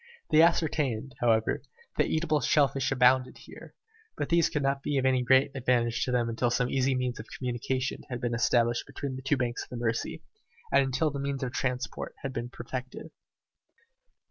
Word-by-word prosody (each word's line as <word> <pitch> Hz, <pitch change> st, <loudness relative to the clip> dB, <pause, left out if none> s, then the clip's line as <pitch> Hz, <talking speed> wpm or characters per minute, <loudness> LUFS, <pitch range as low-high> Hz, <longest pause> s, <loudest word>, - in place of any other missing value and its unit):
They 155 Hz, -, +7 dB
ascertained, 145 Hz, -7 st, +1 dB
however, 110 Hz, -2 st, +2 dB, 0.4 s
that -, -, +3 dB
eatable 155 Hz, -2 st, +1 dB
shell 145 Hz, -2 st, +4 dB
fish 135 Hz, 0 st, -2 dB
abounded 130 Hz, 0 st, +3 dB
there, -, -, -13 dB, 0.4 s
but -, -, -2 dB
these 170 Hz, -1 st, +3 dB
could 145 Hz, -, -2 dB
not 135 Hz, 0 st, 0 dB
be 140 Hz, 0 st, -1 dB
of 130 Hz, -, +1 dB
any 130 Hz, -1 st, +3 dB
great 130 Hz, +2 st, +4 dB
advantage 120 Hz, -2 st, +1 dB
to 125 Hz, -, -2 dB
them 120 Hz, -2 st, +1 dB
until 115 Hz, +1 st, 0 dB
some 125 Hz, +1 st, 0 dB
easy 135 Hz, 0 st, +1 dB
means 125 Hz, -1 st, -2 dB
of 110 Hz, -, -8 dB
communication 130 Hz, +1 st, -2 dB
had 125 Hz, -1 st, -4 dB
been 120 Hz, -1 st, -2 dB
established 120 Hz, 0 st, +1 dB
between 140 Hz, -2 st, -5 dB
the 130 Hz, -, -7 dB
two 135 Hz, +2 st, +1 dB
banks 125 Hz, -1 st, -2 dB
of -, -, -9 dB
the 125 Hz, -, -6 dB
Mercy, 115 Hz, -1 st, -2 dB, 0.5 s
and 140 Hz, -, +5 dB
until 135 Hz, +4 st, 0 dB
the 140 Hz, -, -5 dB
means 140 Hz, -1 st, -3 dB
of 125 Hz, -, -2 dB
transport 125 Hz, -1 st, -3 dB
had 135 Hz, -1 st, -3 dB
been 120 Hz, 0 st, -4 dB
perfected. 130 Hz, +5 st, -7 dB
130 Hz, 190 wpm, -28 LUFS, 120-140 Hz, 0.5 s, They